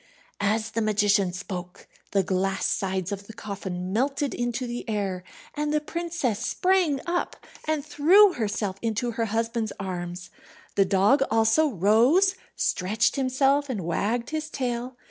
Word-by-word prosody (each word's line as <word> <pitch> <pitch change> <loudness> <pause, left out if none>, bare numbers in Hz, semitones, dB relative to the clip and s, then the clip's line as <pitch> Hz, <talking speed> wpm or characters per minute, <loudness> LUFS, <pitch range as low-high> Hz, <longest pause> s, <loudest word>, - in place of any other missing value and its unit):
As 215 +2 0
the 230 - -1
magician 205 -3 +2
spoke 180 -1 -7 0.2
the 195 -1 +2
glass 195 +1 0
sides 190 -1 -1
of 200 0 -5
the 225 - -10
coffin 190 -4 -5
melted 275 +4 0
into 240 +1 -2
the 240 0 -4
air, 195 -4 -2 0.3
and 295 0 -2
the 305 - +2
princess 330 -8 -2
sprang 360 -7 +2
up, 350 0 -1 0.3
and 310 -2 -1
threw 360 +7 +6
herself 205 -3 -2
into 230 +1 -1
her 230 0 -1
husband's 225 0 -1
arms. 180 -1 -5 0.4
The 195 - +3
dog 200 +9 +3
also 225 +8 +3
rose, 245 - +4 0.2
stretched 210 +5 +1
himself, 275 +1 +2
and 225 -7 -2
wagged 225 - -1
his 310 0 -3
tail. 250 -2 -3
225 Hz, 145 wpm, -26 LUFS, 195-275 Hz, 0.4 s, threw